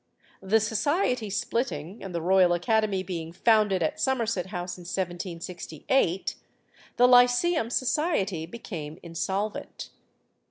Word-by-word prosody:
The 200 +4 +3
society 240 - 0
splitting, 195 - -3
and 195 - -6
the 170 - -2
Royal 185 0 +4
Academy 205 +1 +1
being 170 -3 -5
founded 205 -1 +3
at 155 - -2
Somerset 230 -8 0
House 180 -2 -5
in 180 - -12
1768, 175 - -2 0.6
the 245 - +6
Lyceum 245 +3 +4
Society 240 - 0
became 165 -7 -7
insolvent. 190 +5 -4
195 Hz, 110 wpm, -27 LUFS, 175-230 Hz, 0.6 s, the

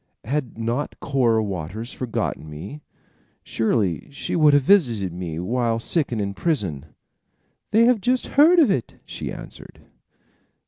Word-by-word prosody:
"Had 135 0 -3
not 115 +5 -3
Cora 120 -5 +1
Waters 100 - -5
forgotten 115 -10 -3
me, 95 - -8 0.6
surely 110 -6 -1
she 140 - -4
would 155 -3 +5
have 145 - +4
visited 120 - +3
me 85 -3 -5
while 115 +4 0
sick 145 +6 -1
and 115 - -2
in 100 -1 -2
prison." 95 - -2 0.8
"They 225 +2 +4
have 240 -3 +3
just 250 +4 +1
heard 315 +6 +6
of 295 - +5
it," 125 - -2
she - - -6
answered. - - -11
120 Hz, 140 wpm, -23 LUFS, 100-150 Hz, 0.8 s, heard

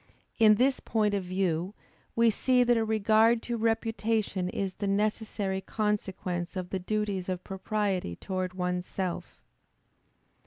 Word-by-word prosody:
In 215 -1 +7
this 260 +4 +2
point 210 -2 0
of 200 -2 0
view, 185 0 -1 0.4
we 230 0 +5
see 250 +3 +3
that 240 0 +3
a 225 - +2
regard 220 +1 +3
to 240 - -2
reputation 225 -4 0
is 190 0 -2
the 200 - -3
necessary 205 -1 -1
consequence 190 -4 -2
of 180 -1 -5
the 190 - -1
duties 200 -1 -2
of 185 -1 -3
propriety 195 - -2
toward 185 - -4
one's 180 0 -2
self. 185 -3 -5
205 Hz, 140 wpm, -29 LUFS, 185-220 Hz, 0.4 s, In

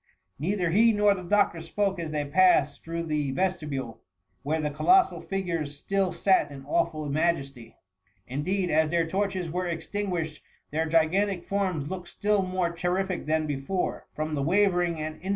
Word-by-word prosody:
Neither 180 +2 0
he 225 +5 +5
nor 205 -1 +4
the 190 - -6
doctor 180 -2 +2
spoke 195 +3 -1
as 165 -2 -3
they 150 -1 -2
passed 150 -2 +3
through 165 +1 -3
the 150 -4 -1
vesti 180 -2 -1
bule, 130 -5 -5 0.4
where 155 +3 -1
the 150 -1 -1
colossal 365 - +3
figures 170 -7 -3
still 195 +3 0
sat 190 -5 +2
in 135 -1 -9
awftil 155 +1 -1
majesty; 140 -6 -1 0.5
indeed, 180 - -1
as 155 0 +3
their 170 0 +1
torches 185 -1 -2
were 180 +2 -2
extin* 190 +4 -3
guished, 160 -4 -3 0.3
their 160 +2 0
gigantic 175 +4 +2
forms 185 -7 -1
looked 180 -2 -5
still 205 +3 +1
more 185 -2 -1
j 170 - -12
terrific 185 -2 -1
than 155 0 +1
before, 150 +6 -3
from 155 0 -3
the 145 - -1
wavering 175 0 +2
and 155 0 -5
in. 190 - -6
170 Hz, 170 wpm, -27 LUFS, 155-190 Hz, 0.5 s, he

